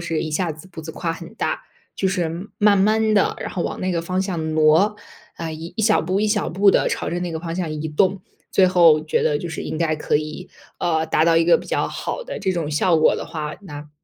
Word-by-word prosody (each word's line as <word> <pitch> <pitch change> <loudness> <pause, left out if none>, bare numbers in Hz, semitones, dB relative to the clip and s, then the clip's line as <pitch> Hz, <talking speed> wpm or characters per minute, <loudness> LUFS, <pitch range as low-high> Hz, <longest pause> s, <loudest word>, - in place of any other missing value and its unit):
是 165 -2 -2
一 155 - -4
下 175 +2 0
子 155 +3 -9
步 180 - -9
子 160 - -7
跨 165 0 -2
很 165 +2 -10
大， - - -2 0.3
就 190 - +1
是 180 0 -2
慢 205 -1 +5
慢 215 +2 +3
地， 200 - +2
然 - - -4
后 175 - -3
往 - - -4
那 185 0 -1
个 170 -1 -1
方 185 +2 -1
向 165 -5 -3
挪， 160 +7 +4 0.4
啊， 165 -1 -4
一 160 +2 -8
一 220 - -1
小 215 0 +4
步、 185 +4 0
一 215 - +2
小 210 -1 0
步 195 +4 +4
地 - - +3
朝 - - -2
着 175 - -2
那 175 -1 -3
个 160 - -3
方 165 -1 -5
向 175 -3 -2
移 155 +1 -4
动， 185 +5 +1 0.3
最 190 - +5
后 170 -4 +5
觉 155 - 0
得 145 - +1
就 175 - -5
是 160 - -5
应 - - -4
该 160 -2 +1
可 150 - +1
以， 155 +4 -6 0.3
呃， 160 -2 0
达 155 - +2
到 165 0 +4
一 165 - +4
个 170 - +6
比 - - -10
较 - - 0
好 - - -4
的 - - -6
这 190 - 0
种 165 -4 -2
效 165 +3 +2
果 155 - +4
的 - - -5
话， 150 -2 -5
那 150 -5 -9
170 Hz, 280 characters per minute, -21 LUFS, 160-190 Hz, 0.4 s, 个